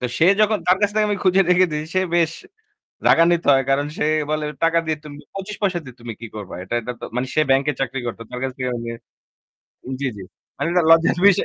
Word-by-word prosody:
তো - - -5
সে 165 - +5
যখন 215 0 +3
তার 180 +1 +5
কাছ 205 -1 +2
থেকে 215 0 +2
আমি 205 - 0
খুঁজে 185 +1 +4
রেখে 180 +1 +5
দিয়েছি 150 +1 -4
সে 185 - +4
বেশ 165 -2 +2 0.8
রাগান্বিত 170 +1 +4
হয়। 135 -1 +4
কারণ 140 +1 +2
সে - - 0 0.3
বলে 155 0 -1 0.2
টাকা 165 0 +4
দিয়ে 155 -1 -1
তুমি 145 -1 -9 0.2
২৫ 195 +2 -5
পয়সা 190 -4 +1
দিয়ে 130 -2 -11
তুমি 120 -1 -6
কি 115 - -6
করবা? 105 -3 -7
এটা 95 +6 -4
এটাতো 125 +1 -7
মানে 125 +1 -1
সে 155 - +4
ব্যাংকে 135 +2 +3
চাকরি 135 0 -2
করত। 115 - -5
তার 125 - -6
কাছ 135 - -1
থেকে 130 -1 -2
আমি 115 0 -5 1.1
জ্বী, 140 - 0
জ্বী। 95 - -8 0.3
মানে - - -2
এটা 180 0 +3
লজ্জার 165 +1 +5
বিষয় 200 -3 +5
155 Hz, 225 wpm, -21 LUFS, 130-180 Hz, 1.1 s, সে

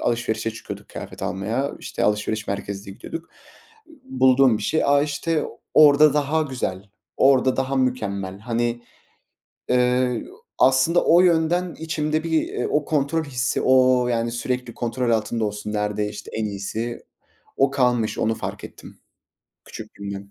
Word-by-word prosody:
alışverişe 115 -1 -1
çıkıyorduk - - -9
kıyafet - - -9
almaya. 115 +9 -2
İşte - - -3
alışveriş 105 +1 0
merkezine 100 0 -5
gidiyorduk. 165 +9 -8 0.8
Bulduğum 130 - +4
bir - - -7
şey. 160 +9 +1
A, 140 0 +4
işte 150 +2 -1 0.3
orada 150 -1 +7
daha 150 +2 +1
güzel, 105 -9 -4 0.3
orada 130 -1 +4
daha 135 +1 -1
mükemmel. 100 -7 -2
Hani, 120 +1 -2 0.9
eee, 125 0 +2 0.4
aslında 135 +6 +4
o 170 +2 +6
yönden 175 0 +2
içimde 155 -1 -1
bir 160 -1 -1
o 150 -1 +1
kontrol 150 +2 0
hissi, 130 -3 -1
o, 130 -1 +4
yani, 115 -1 0
sürekli 125 0 -3
kontrol 120 +1 -2
altında 115 0 0
olsun, 105 0 -5
nerede 105 0 -1
işte 105 0 -9
en 110 - -2
iyisi, 105 +4 -4 0.6
o 135 0 +3
kalmış, 125 -5 +1
onu 110 +1 +1
fark - - -6
ettim - - -12 0.7
küçüklüğümden. 100 0 -8
125 Hz, 135 wpm, -23 LUFS, 110-145 Hz, 0.9 s, orada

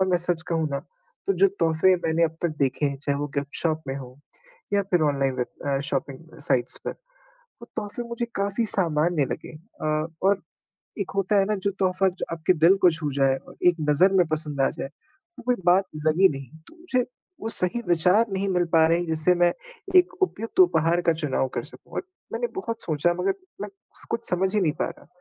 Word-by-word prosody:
और 190 - +2
मैं 180 - +4
सच 170 -1 0
कहूँ 160 -2 0
ना 140 - -1 0.5
तो 395 - +3
जो 395 - +5
तोहफ़े 165 +4 +4
मैंने 165 +1 +3
अब 160 0 -2
तक 175 - +2
देखे 140 +1 +1
हैं 140 -1 -2
चाहे 140 -1 -1
वो 145 - -2
गिफ्ट 140 0 -3
शॉप 160 -1 0
में 135 - -2
हो 130 -1 -9 0.5
या 200 - +3
फ़िर 180 -4 +1
ऑनलाइन 135 -3 +1
वेब 125 - -1 0.3
अ, - - -1
शॉपिंग 140 +3 -4
साइट्स 125 -3 +1
पे - - -1
वो - - -17 0.6
तोहफ़े 210 +3 -4
मुझे 235 0 -2
काफ़ी 200 +3 0
सामान्य 165 -4 +2
लगे। - - -5
अ, 155 -3 -3 0.2
और 195 0 +3 0.6
एक 200 - -2
होता 195 +1 +2
है 195 - +4
ना 215 - +1
जो - - +4
तोहफ़ा 190 0 +2 0.2
आपके 165 +2 +2
दिल 170 +4 +5
को - - +8
छू 150 -3 -2
जाए 135 -1 +3
और - - -14
एक 175 - +3
नज़र 180 +7 +5
में 175 - +4
पसंद 150 -3 -2
आ - - +3
जाए 135 - -3
तो 310 - -20
कोई 250 +1 +1
बात 185 +3 +5 0.2
लगी 180 +5 +5
नहीं। 140 +2 -8
तो - - -17
मुझे 255 -8 0 0.4
वो 220 - -3
सही 180 +5 -1
विचार 180 +6 +4
नहीं 195 +1 -1
मिल 180 -2 +2
पा 160 -1 +6
रहे 165 +1 +3
हैं 175 - -2
जिससे 160 +2 +2
मैं 175 0 +4 0.4
एक 365 0 +6
उपयुक्त 230 - 0
उपहार 170 - +4
का - - +7
चुनाव 150 -4 -1
कर - - -1
सकूँ - - -16
और - - -1 0.3
मैंने 485 - -1
बहुत 230 -11 -4
सोचा 165 +2 +1
मगर 180 - +2 0.3
मैं - - -5 0.4
कुछ 230 0 -2
समझ 190 +3 +1
ही 210 - +3
नहीं 160 -6 +2
पा - - +2
रहा। - - -14
170 Hz, 210 wpm, -25 LUFS, 150-195 Hz, 0.6 s, को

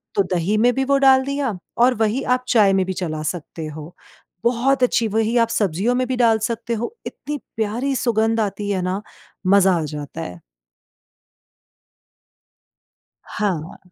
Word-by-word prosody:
तो 200 - +3
दही 180 +5 +1
में 245 +3 +4
भी 270 - +1
वो 280 +1 +3
डाल 265 -1 +5
दिया 275 -7 -2 0.2
और 250 +2 +5
वही 225 +4 0
आप 250 - -18
चाय 210 -6 +4
में 190 -1 +2
भी 190 - -3
चला 160 -4 -4
सकते 165 -1 -8
हो। 155 +2 -9 0.5
बहुत 255 +3 +2
अच्छी 235 -2 +2
वही 225 +2 0
आप 230 -1 +3
सब्जियों 205 +2 0
में 255 0 +1
भी 260 - -1
डाल 230 -2 +4
सकते 235 0 -3
हो 235 - -4
इतनी 295 0 -5 0.2
प्यारी 235 +6 -1
सुगंध 225 -2 +1
आती 205 -1 -2
है 190 -2 0
ना, 185 +2 -2 0.5
मजा 195 -1 +5
आ - - -2
जाता 150 +1 -6
है। 90 - -7 2.8
हाँ। 185 -6 -3
220 Hz, 160 wpm, -21 LUFS, 190-245 Hz, 2.8 s, डाल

